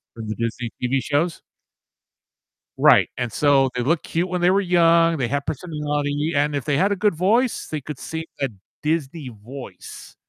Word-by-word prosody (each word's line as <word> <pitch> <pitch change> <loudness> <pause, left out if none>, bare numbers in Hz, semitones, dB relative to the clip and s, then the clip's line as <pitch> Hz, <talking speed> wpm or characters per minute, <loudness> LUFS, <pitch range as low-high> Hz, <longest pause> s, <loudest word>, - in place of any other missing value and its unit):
From 115 -1 -7
the 110 - -3
Disney 115 0 -3
TV 130 +2 +1
shows? 150 +6 0 1.4
Right, - - +6
and, 120 -3 -2
so, 140 -1 +3
they 125 - 0
looked 160 +5 +1
cute 175 +3 -1
when 180 0 -2
they 175 +1 +5
were 195 +1 +3
young, 170 -2 +4
they 125 -4 0
had 140 +2 -2
personality, 150 -1 -2
and 145 +1 +1
if 140 - -2
they 145 -2 +1
had 195 +6 +2
a - - +2
good 205 0 +2
voice, 220 +9 +1
they 155 -2 -4
could 145 -1 -7
sing 160 0 -5 0.2
a 135 - +1 0.3
Disney 150 -2 -2
voice. 125 +4 -11
150 Hz, 180 wpm, -22 LUFS, 135-170 Hz, 1.4 s, Right